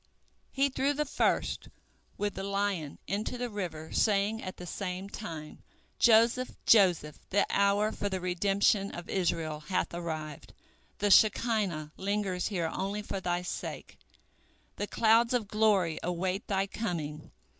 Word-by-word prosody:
He 275 Hz, +1 st, +2 dB
threw 275 Hz, +2 st, +1 dB
the 300 Hz, +1 st, -1 dB
first, 275 Hz, -, 0 dB, 0.5 s
with 205 Hz, -1 st, -1 dB
the -, -, -5 dB
lion, 195 Hz, -6 st, -1 dB
into 210 Hz, +5 st, -2 dB
the 245 Hz, -1 st, -3 dB
river, 170 Hz, -6 st, -5 dB
saying 210 Hz, +1 st, +2 dB
at 185 Hz, -, -6 dB
the 180 Hz, -, -8 dB
same 185 Hz, +1 st, -4 dB
time, 160 Hz, -8 st, -7 dB, 0.4 s
"Joseph, 235 Hz, +2 st, +4 dB
Joseph, 175 Hz, -8 st, +4 dB
the 200 Hz, -, +3 dB
hour 200 Hz, +2 st, +3 dB
for 205 Hz, -, -3 dB
the 190 Hz, -1 st, -2 dB
redemption 195 Hz, +3 st, +2 dB
of 175 Hz, 0 st, -7 dB
Israel 165 Hz, -5 st, -1 dB
hath 185 Hz, +4 st, -2 dB
arrived, 155 Hz, -4 st, -5 dB, 0.4 s
the 205 Hz, 0 st, +1 dB
Shekinah 205 Hz, -8 st, +3 dB
lingers 195 Hz, -2 st, -1 dB
here 170 Hz, -6 st, -1 dB
only 200 Hz, +2 st, -3 dB
for 195 Hz, -, -4 dB
thy 175 Hz, -1 st, -1 dB
sake, 180 Hz, -, -6 dB, 0.8 s
the 205 Hz, -, -2 dB
clouds 230 Hz, +3 st, +4 dB
of 225 Hz, -4 st, -1 dB
glory 200 Hz, -6 st, +2 dB
await 180 Hz, +3 st, -2 dB
thy 195 Hz, -1 st, +1 dB
coming. 165 Hz, -8 st, -4 dB
195 Hz, 140 wpm, -30 LUFS, 175-210 Hz, 0.8 s, Joseph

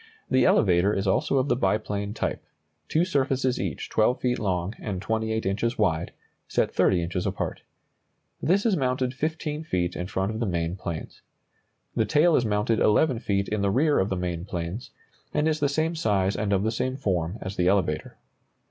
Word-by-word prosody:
The 130 Hz, -1 st, +4 dB
elevator 95 Hz, -1 st, +4 dB
is 95 Hz, -, -1 dB
also 95 Hz, +7 st, +2 dB
of 130 Hz, +1 st, +2 dB
the -, -, +2 dB
biplane 105 Hz, -3 st, -1 dB
type, -, -, -2 dB, 0.5 s
two 165 Hz, +3 st, +2 dB
surfaces 135 Hz, -6 st, 0 dB
each 90 Hz, -8 st, -3 dB
12 110 Hz, +3 st, +2 dB
feet 125 Hz, 0 st, 0 dB
long 95 Hz, -1 st, -1 dB
and 100 Hz, -4 st, -4 dB
28 110 Hz, +2 st, -1 dB
inches 105 Hz, +5 st, 0 dB
wide, 85 Hz, -6 st, +1 dB, 0.4 s
set -, -, 0 dB
30 90 Hz, -2 st, +3 dB
inches 90 Hz, +1 st, -2 dB
apart. -, -, -3 dB, 0.8 s
This 195 Hz, +6 st, +2 dB
is 220 Hz, -4 st, +3 dB
mounted 130 Hz, -2 st, 0 dB
15 155 Hz, +1 st, -3 dB
feet 90 Hz, -, -1 dB
in 90 Hz, -, -4 dB
front 95 Hz, +1 st, -1 dB
of 110 Hz, -, -4 dB
the 115 Hz, -, 0 dB
main 85 Hz, -1 st, -1 dB
planes. 85 Hz, -4 st, -6 dB, 0.7 s
The -, -, +2 dB
tail 160 Hz, +2 st, +4 dB
is 120 Hz, -, +2 dB
mounted 105 Hz, +1 st, +1 dB
11 120 Hz, +4 st, +3 dB
feet 100 Hz, -3 st, 0 dB
in 105 Hz, -1 st, -1 dB
the 100 Hz, -, +2 dB
rear 145 Hz, +8 st, +3 dB
of 95 Hz, -, +1 dB
the 95 Hz, -, -1 dB
main 90 Hz, -2 st, -3 dB
planes, 90 Hz, +5 st, -5 dB, 0.5 s
and 150 Hz, +1 st, +2 dB
is 155 Hz, -1 st, +1 dB
the 145 Hz, -1 st, +2 dB
same 155 Hz, +3 st, 0 dB
size 100 Hz, -9 st, +1 dB
and 105 Hz, -1 st, -1 dB
of 100 Hz, -1 st, +2 dB
the 110 Hz, -, +1 dB
same 130 Hz, +3 st, -2 dB
form 90 Hz, -6 st, -1 dB
as 95 Hz, +1 st, -6 dB
the 90 Hz, -, +1 dB
elevator. 90 Hz, -6 st, 0 dB
105 Hz, 190 wpm, -26 LUFS, 95-130 Hz, 0.8 s, The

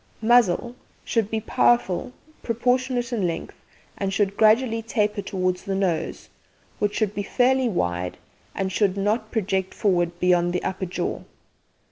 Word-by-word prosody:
MUZZLE 240 Hz, -1 st, +3 dB, 0.3 s
Should 225 Hz, -3 st, 0 dB
be 220 Hz, -, -1 dB
powerful, 225 Hz, -2 st, +1 dB, 0.3 s
proportionate 245 Hz, +1 st, 0 dB
in 200 Hz, -6 st, +1 dB
length, 165 Hz, -, -4 dB, 0.4 s
and 195 Hz, -1 st, -2 dB
should 200 Hz, 0 st, 0 dB
gradually 225 Hz, +2 st, +3 dB
taper 210 Hz, -2 st, -1 dB
towards 185 Hz, -2 st, -1 dB
the 195 Hz, -, -1 dB
nose, 185 Hz, -4 st, -1 dB, 0.5 s
which 205 Hz, 0 st, 0 dB
should 215 Hz, -3 st, 0 dB
be 205 Hz, -, -2 dB
fairly 255 Hz, +4 st, +2 dB
wide, 90 Hz, -, -2 dB, 0.4 s
and 190 Hz, -1 st, -2 dB
should 195 Hz, 0 st, +1 dB
not 210 Hz, +4 st, 0 dB
project 190 Hz, -4 st, -1 dB
forward 175 Hz, -4 st, +1 dB
beyond 175 Hz, -1 st, +2 dB
the 180 Hz, -, -1 dB
upper 190 Hz, 0 st, -3 dB
jaw. 175 Hz, -, -3 dB
205 Hz, 140 wpm, -24 LUFS, 185-230 Hz, 0.5 s, MUZZLE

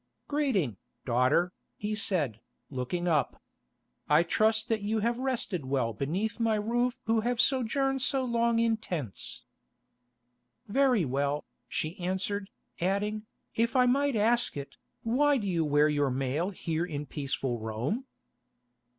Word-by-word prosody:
"Greeting, 230 Hz, -, +1 dB, 0.3 s
daughter," 130 Hz, +9 st, +3 dB, 0.2 s
he 210 Hz, +1 st, -2 dB
said, 165 Hz, -, -1 dB, 0.3 s
looking 140 Hz, +7 st, -2 dB
up. 155 Hz, -4 st, +1 dB, 0.7 s
"I 165 Hz, -, +6 dB
trust 220 Hz, +5 st, +2 dB
that 225 Hz, -2 st, 0 dB
you 215 Hz, +1 st, 0 dB
have 235 Hz, +2 st, 0 dB
rested 245 Hz, -, -1 dB
well 130 Hz, -4 st, 0 dB
beneath 180 Hz, -, -2 dB
my 225 Hz, -1 st, +2 dB
roof 240 Hz, +4 st, 0 dB
who 225 Hz, 0 st, +3 dB
have 240 Hz, +2 st, -1 dB
sojourned 270 Hz, +1 st, +2 dB
so 270 Hz, -1 st, +2 dB
long 235 Hz, -1 st, +2 dB
in 230 Hz, -1 st, +3 dB
tents." 155 Hz, -, -4 dB, 1.2 s
"Very 250 Hz, -, +3 dB
well," 140 Hz, +2 st, -1 dB, 0.2 s
she 155 Hz, +4 st, -3 dB
answered, 195 Hz, +2 st, -2 dB, 0.3 s
adding, 205 Hz, +4 st, -1 dB, 0.3 s
"If 230 Hz, +2 st, +1 dB
I 250 Hz, -1 st, +6 dB
might 275 Hz, +1 st, +2 dB
ask 225 Hz, -3 st, +2 dB
it, 140 Hz, -1 st, -7 dB, 0.3 s
why 280 Hz, +5 st, +3 dB
do 215 Hz, -, -3 dB
you 170 Hz, -3 st, +1 dB
wear 150 Hz, 0 st, +4 dB
your 145 Hz, -2 st, +2 dB
mail 135 Hz, +7 st, -1 dB
here 165 Hz, -4 st, -2 dB
in 150 Hz, -4 st, -4 dB
peaceful 135 Hz, -4 st, -2 dB
Rome?" 115 Hz, -, -2 dB
200 Hz, 135 wpm, -29 LUFS, 145-235 Hz, 1.2 s, I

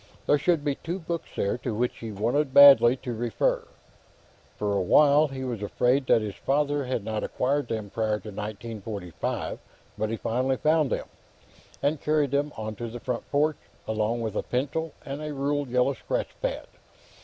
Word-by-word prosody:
There 145 Hz, -, +3 dB
should 160 Hz, 0 st, +2 dB
be 145 Hz, -, +2 dB
two 170 Hz, +6 st, -5 dB
books 170 Hz, -2 st, -5 dB
there 100 Hz, +4 st, -1 dB
to 120 Hz, -4 st, -3 dB
which 120 Hz, +3 st, -1 dB
he 115 Hz, -1 st, -6 dB
wanted 125 Hz, +7 st, 0 dB
badly 140 Hz, -3 st, +9 dB
to 125 Hz, -, -3 dB
refer. 115 Hz, -1 st, 0 dB, 0.9 s
For 105 Hz, -1 st, -1 dB
a 100 Hz, -, +1 dB
while, 145 Hz, +10 st, +5 dB
he 135 Hz, -1 st, -6 dB
was 120 Hz, -5 st, -4 dB
afraid 125 Hz, +6 st, +1 dB
that 110 Hz, -, +4 dB
his 105 Hz, -2 st, -4 dB
father 145 Hz, +2 st, 0 dB
had 125 Hz, -4 st, -2 dB
not 110 Hz, 0 st, -3 dB
acquired 140 Hz, +1 st, 0 dB
them 110 Hz, -3 st, -4 dB
prior 110 Hz, -2 st, 0 dB
to 110 Hz, -, -8 dB
1945, 105 Hz, -3 st, -5 dB, 0.4 s
but 110 Hz, 0 st, 0 dB
he 115 Hz, -, -2 dB
finally 130 Hz, +4 st, 0 dB
found 155 Hz, -1 st, +2 dB
them, -, -, -2 dB, 0.8 s
and 145 Hz, +1 st, +1 dB
carried 150 Hz, -3 st, +1 dB
them 145 Hz, +1 st, 0 dB
onto 110 Hz, +1 st, -5 dB
the 120 Hz, +2 st, -7 dB
front 125 Hz, 0 st, -4 dB
porch, 150 Hz, +1 st, +2 dB, 0.3 s
along 110 Hz, +2 st, 0 dB
with 110 Hz, -2 st, -3 dB
a -, -, +1 dB
pencil 145 Hz, +6 st, -2 dB
and 140 Hz, +2 st, -5 dB
a 150 Hz, -1 st, -4 dB
ruled 140 Hz, 0 st, -1 dB
yellow 125 Hz, +2 st, +2 dB
scratch -, -, -3 dB
pad. -, -, -2 dB
125 Hz, 180 wpm, -26 LUFS, 110-145 Hz, 0.9 s, badly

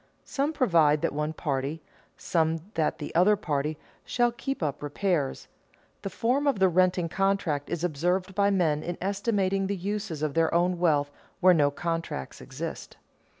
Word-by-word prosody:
Some 285 Hz, +2 st, -1 dB
provide 165 Hz, -, +3 dB
that -, -, 0 dB
one 150 Hz, +1 st, -1 dB
party, 145 Hz, -1 st, -2 dB, 0.4 s
some 160 Hz, -1 st, 0 dB
that 160 Hz, -2 st, 0 dB
the 145 Hz, -, -7 dB
other 185 Hz, +5 st, +5 dB
party, 150 Hz, -5 st, -2 dB, 0.3 s
shall 240 Hz, -1 st, +1 dB
keep 270 Hz, -, -4 dB
up 145 Hz, -2 st, -2 dB
repairs. 145 Hz, -1 st, -1 dB, 0.5 s
The 195 Hz, -, -4 dB
form 255 Hz, +8 st, 0 dB
of 275 Hz, -, +2 dB
the 190 Hz, -1 st, +4 dB
renting 180 Hz, 0 st, +2 dB
contract 185 Hz, -6 st, 0 dB
is 170 Hz, -1 st, -3 dB
observed 180 Hz, +4 st, 0 dB
by 200 Hz, +1 st, +3 dB
men 165 Hz, -7 st, +1 dB
in 175 Hz, +1 st, -4 dB
estimating 195 Hz, -1 st, 0 dB
the 200 Hz, 0 st, -2 dB
uses 195 Hz, -4 st, -3 dB
of 150 Hz, -2 st, -1 dB
their 165 Hz, +1 st, +2 dB
own 175 Hz, +1 st, +2 dB
wealth 145 Hz, -5 st, +2 dB, 0.3 s
where 185 Hz, 0 st, +6 dB
no 145 Hz, -4 st, +4 dB
contract 165 Hz, -, -4 dB
exists. -, -, -7 dB
175 Hz, 160 wpm, -27 LUFS, 155-195 Hz, 0.5 s, where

